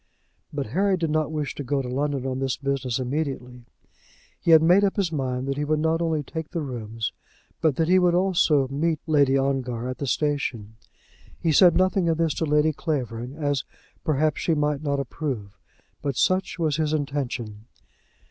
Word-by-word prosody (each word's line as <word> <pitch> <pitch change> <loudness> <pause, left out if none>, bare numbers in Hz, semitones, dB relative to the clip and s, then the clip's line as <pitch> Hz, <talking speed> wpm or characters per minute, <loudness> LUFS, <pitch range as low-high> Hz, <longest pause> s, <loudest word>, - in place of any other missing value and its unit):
But 145 -2 -3
Henry 190 - +1
did 165 -3 -1
not 155 0 0
wish 150 -2 -2
to 145 - -6
go 135 +1 -1
to - - -5
London 135 +1 -1
on 130 0 -2
this 135 -1 -1
business 135 -3 -1
immediately. 125 -2 -3 0.7
He - - -2
had 160 -1 +8
made 180 +5 +5
up 195 - +2
his 195 -5 0
mind 130 -3 -2
that 135 0 -2
he 145 - -1
would 155 +1 +1
not 160 +2 +1
only 160 -3 0
take 160 +2 -6
the 170 - -3
rooms, 115 -4 -4 0.5
but 155 -4 +2
that 160 - +1
he 185 +2 +5
would 175 -1 +3
also 170 -7 +3
meet 155 +3 0
Lady 140 -4 +3
Ongar 130 -3 -1
at 130 - -5
the 140 - -3
station. 130 -7 -1 0.6
He 165 - +1
said 175 +2 +6
nothing 185 -1 +2
of 160 - +1
this 165 -2 +1
to 160 - +1
Lady 150 +1 +3
Clavering, 125 -5 -3
as, 145 -3 -1 0.4
perhaps, 155 0 +1
she 165 - +1
might 150 -1 0
not 140 -2 -1
approve; 125 -7 -4 0.5
but 140 -3 -2
such 185 0 +1
was 155 -4 0
his 155 -1 0
intention. 125 -7 -3
145 Hz, 185 wpm, -25 LUFS, 130-160 Hz, 0.7 s, had